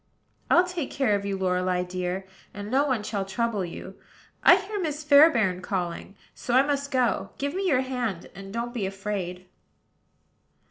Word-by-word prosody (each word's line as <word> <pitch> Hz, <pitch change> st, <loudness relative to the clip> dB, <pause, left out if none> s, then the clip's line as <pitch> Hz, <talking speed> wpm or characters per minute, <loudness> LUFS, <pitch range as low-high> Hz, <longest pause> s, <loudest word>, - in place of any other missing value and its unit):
"I'll 350 Hz, -, +6 dB
take 360 Hz, -6 st, -4 dB
care 265 Hz, -6 st, +1 dB
of 200 Hz, 0 st, -1 dB
you, 195 Hz, -1 st, -2 dB
Lorelei 180 Hz, -1 st, 0 dB
dear; 180 Hz, +1 st, -3 dB, 0.3 s
and 205 Hz, +1 st, -6 dB
no 275 Hz, +3 st, +3 dB
one 250 Hz, -6 st, 0 dB
shall 210 Hz, -2 st, -2 dB
trouble 210 Hz, +1 st, -1 dB
you. 185 Hz, +2 st, -8 dB, 0.4 s
I -, -, +8 dB
hear 400 Hz, +2 st, -4 dB
Miss 310 Hz, -4 st, -3 dB
Fairbairn 280 Hz, -, +5 dB
calling; 180 Hz, 0 st, -4 dB, 0.2 s
so 245 Hz, -, -2 dB
I 260 Hz, -, +7 dB
must 280 Hz, 0 st, -1 dB
go. 245 Hz, -7 st, +1 dB
Give 280 Hz, +1 st, -2 dB
me 385 Hz, +1 st, -1 dB
your 265 Hz, -7 st, +3 dB
hand, 245 Hz, -9 st, -3 dB
and 195 Hz, 0 st, -10 dB
don't 235 Hz, +2 st, -3 dB
be 215 Hz, -6 st, -2 dB
afraid." 190 Hz, -2 st, -4 dB
215 Hz, 170 wpm, -26 LUFS, 190-280 Hz, 0.4 s, I